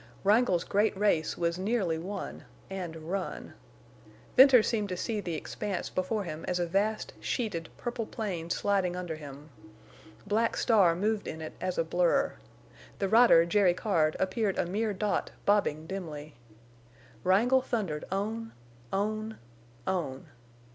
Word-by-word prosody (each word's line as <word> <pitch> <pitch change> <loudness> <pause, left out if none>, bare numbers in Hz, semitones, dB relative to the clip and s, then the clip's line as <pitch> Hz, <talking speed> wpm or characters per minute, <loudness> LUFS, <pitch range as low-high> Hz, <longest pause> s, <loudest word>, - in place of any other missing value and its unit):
Wrangle's 200 -4 +3
great 205 0 +1
race 195 -6 +1
was 170 +1 0
nearly 190 -5 0
won—and 185 -1 -7
run. 170 +5 -5 0.8
Venters 260 -3 +8
seemed 210 -3 0
to 180 - -3
see 215 +3 -2
the 170 -4 -3
expanse 195 +3 -4
before 200 +3 -1
him 160 -3 -6
as 180 - 0
a 175 - 0
vast, 205 +5 -1
sheeted, 195 -10 -2
purple 235 -2 -4
plain 180 -7 -4
sliding 190 -1 +1
under 175 -3 -4
him. 145 0 -10 0.7
Black 220 +3 +1
Star 195 -8 +4
moved 210 +3 -1
in 160 - -5
it 155 - -6
as 185 -1 -2
a - - +3
blur. 175 +11 +2 0.6
The 195 - -1
rider, 220 -7 +7
Jerry 180 0 +3
Card, 165 -7 +1
appeared 195 +1 0
a - - +1
mere 210 +5 -1
dot 205 +1 -1 0.2
bobbing 200 -7 +2
dimly. 155 -5 -6 0.9
Wrangle 230 +8 +4
thundered 195 -12 -2
on—on—on! 205 - -4
190 Hz, 130 wpm, -29 LUFS, 170-215 Hz, 0.9 s, Venters